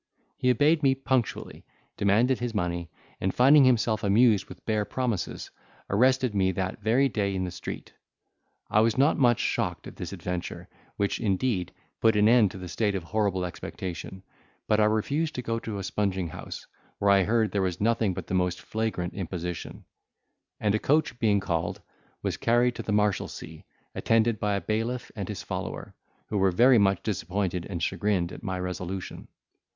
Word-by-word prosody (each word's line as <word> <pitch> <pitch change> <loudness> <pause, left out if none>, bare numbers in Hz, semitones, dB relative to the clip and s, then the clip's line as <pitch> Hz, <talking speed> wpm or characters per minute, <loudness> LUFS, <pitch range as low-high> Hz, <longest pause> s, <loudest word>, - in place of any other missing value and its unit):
He 125 - +1
obeyed 150 +6 +4
me 135 -2 +4
punctually, 130 -3 -2 0.3
demanded 115 +6 +2
his 120 -2 -3
money, 85 -3 -2 0.3
and 95 - 0
finding 135 +5 +6
himself 115 -4 +2
amused 105 +1 +4
with - - -12
bare 110 -2 +1
promises, 110 -2 -3 0.4
arrested 130 +3 +3
me 95 -2 +2
that 95 +1 -3
very 125 +5 +3
day 100 -5 -1
in 95 - -1
the 90 - -3
street. - - -7 0.7
I 105 - +3
was 110 +1 +3
not 140 +4 +3
much 120 -4 +4
shocked - - -1
at - - -10
this - - -5
adventure, 90 -1 -5 0.3
which, 100 0 0
indeed, 100 -3 0 0.3
put 110 -1 +4
an 105 0 +4
end 115 -3 +5
to 95 0 -9
a - - -5
state 105 +2 0
of 95 - -3
horrible 100 -1 0
expectation: 90 +1 -6 0.4
but 105 - +3
I 105 - +5
refused 140 +9 0
to 125 - -4
go 115 0 -1
to 110 -2 -5
a 100 - -4
sponging 95 -2 -1
house, - - -8 0.3
where 100 0 +3
I 100 -1 +5
heard 110 +2 +1
there 100 - 0
was 90 -2 -1
nothing 110 -3 +1
but - - -5
the - - -5
most 90 -1 +1
flagrant 110 -5 -3
imposition: 90 -2 -5 0.7
and, 105 -2 +1
a 110 - +1
coach 145 -3 +1
being 105 -4 +3
called, 85 -2 -2 0.4
was - - -1
carried 120 +1 +2
to - - -3
the - - -4
Marshalsea, 105 -1 -1 0.3
attended 115 -1 +2
by 105 -1 0
a 100 - -2
bailiff 115 +3 -2
and 100 -4 -5
his 105 - -5
follower, - - -5 0.3
who 105 - -2
were 95 0 +4
very 120 +6 +5
much 95 -2 +2
disappointed 95 -3 -2
and 85 -4 -4
chagrined 95 -4 0
at - - -9
my 95 -3 -3
resolution. 90 +1 -5
105 Hz, 175 wpm, -27 LUFS, 95-115 Hz, 0.7 s, finding